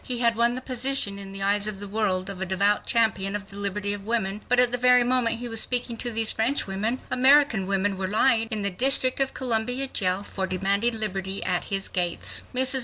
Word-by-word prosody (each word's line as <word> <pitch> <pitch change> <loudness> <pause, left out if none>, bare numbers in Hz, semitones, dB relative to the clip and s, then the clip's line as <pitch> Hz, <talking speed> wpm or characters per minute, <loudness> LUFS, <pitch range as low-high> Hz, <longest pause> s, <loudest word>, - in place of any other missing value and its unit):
He 250 - -2
had 235 -1 +1
won 235 +1 +1
the 255 - -6
position 255 -5 -1
in 195 -1 -9
the 195 0 -6
eyes 205 +1 +1
of 210 -2 -4
the 205 - -6
world 195 -3 -1
of 195 -2 -6
a - - -1
devout 200 +3 +1
champion 205 -4 +1
of 200 0 -6
the - - -11
liberty 205 0 -2
of 205 -1 -7
women, 210 -2 -2
but 250 0 +3
at 250 -1 +3
the 245 - -1
very 250 0 +4
moment 245 -2 0
he 245 +1 -7
was 225 -1 +1
speaking 245 -1 -1
to 240 - -2
these 225 -1 +1
French 235 +6 -1
women 210 +6 -3
American 260 -6 +3
women 195 0 -1
were 190 - -2
lying 225 +3 +2
in 215 -3 0
the 200 - +2
District 255 +6 +3
of 270 0 -1
Columbia 245 +1 0
jail 190 -5 0
for 190 -2 -4
demanding 200 +5 -1
liberty 195 -2 -3
at 180 -1 -1
his 195 -1 -1
gates. 175 -2 0
Mrs. 260 +1 +2
215 Hz, 230 wpm, -24 LUFS, 195-245 Hz, -, very